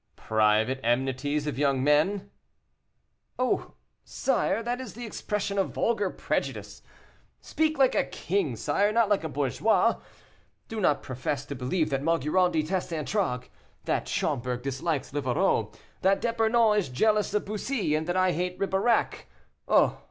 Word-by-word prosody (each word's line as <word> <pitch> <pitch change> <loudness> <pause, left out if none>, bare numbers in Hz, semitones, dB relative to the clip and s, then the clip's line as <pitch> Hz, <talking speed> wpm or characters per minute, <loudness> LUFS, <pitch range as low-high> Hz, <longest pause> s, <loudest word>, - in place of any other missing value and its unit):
"Private 110 +4 +2
enmities 135 +5 0
of 150 -2 -3
young 140 -3 +2
men?" 155 +8 +2 1.1
"Oh! 255 0 -1 0.3
sire, 230 - 0
that 245 +2 -2
is 250 -6 -8
the 240 +1 -6
expression 205 -2 -3
of 195 - -1
vulgar 210 -4 +1
prejudice; - - -3 0.6
speak 315 0 -1
like 265 -2 +4
a - - +2
king, 175 -9 -2
sire, 200 - +1
not 230 -1 +2
like 205 -5 +2
a 160 - -3
bourgeois. 145 - +1 0.7
Do 225 -1 -4
not 150 -6 +2
profess 130 +2 -3
to - - -6
believe 140 +5 -1
that 135 -1 0
Maugiron 165 +4 +2
detests 170 +3 -1
Antragues, 155 -5 -2 0.4
that - - -1
Schomberg 125 0 -2
dislikes 140 +2 -2
Livarot, 135 -4 +1 0.3
that 195 +1 +3
D'Epernon 230 -1 +2
is 185 - -3
jealous 210 - +2
of 210 - 0
Bussy, 215 - -2
and 155 +1 -1
that 175 +1 0
I 185 0 +3
hate 180 +1 -2
Ribeirac. 195 +4 0 0.4
Oh! - - +3
175 Hz, 145 wpm, -27 LUFS, 135-210 Hz, 1.1 s, like